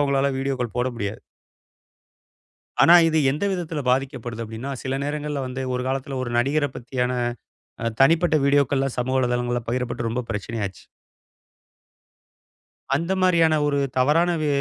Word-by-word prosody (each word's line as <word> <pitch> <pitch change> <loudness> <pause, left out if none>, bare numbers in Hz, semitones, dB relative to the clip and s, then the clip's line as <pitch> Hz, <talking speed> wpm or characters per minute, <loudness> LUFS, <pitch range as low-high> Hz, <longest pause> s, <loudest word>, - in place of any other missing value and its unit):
அவங்களால 140 -1 +2
வீடியோக்கள் 130 -4 -2
போட 125 - +1
முடியாது. 100 -1 -4 1.6
ஆனா, 170 - +8
இது 160 - +1
எந்த 150 +8 -2
விதத்துல 165 -4 -3
பாதிக்கப்படுது 125 -3 -2
அப்படின்னா, 110 +5 -6
சில 135 0 -2
நேரங்கள்ல 145 -1 -3
வந்து 130 +1 -4
ஒரு 125 - -1
காலத்துல 135 0 -3
ஒரு 120 - -4
நடிகரப் 140 +2 +1
பத்தியான, 125 +1 -2 0.7
அ 115 - +1
தனிப்பட்ட 160 +3 +4
வீடியோக்கள்லாம் 140 -1 +2
சமூக 130 +2 0
வலைத்தளங்கள்ல 120 -1 0
பகிரப்பட்டு 120 -1 -2
ரொம்ப 125 +2 -2
பிரச்சனையாச்சு. 105 -2 -4 2.1
அந்த 170 +5 -1
மாரியான 165 -3 +4
ஒரு 145 -1 +1 0.2
தவறான 155 +7 +3
வி 150 - 0
135 Hz, 125 wpm, -23 LUFS, 120-145 Hz, 2.1 s, ஆனா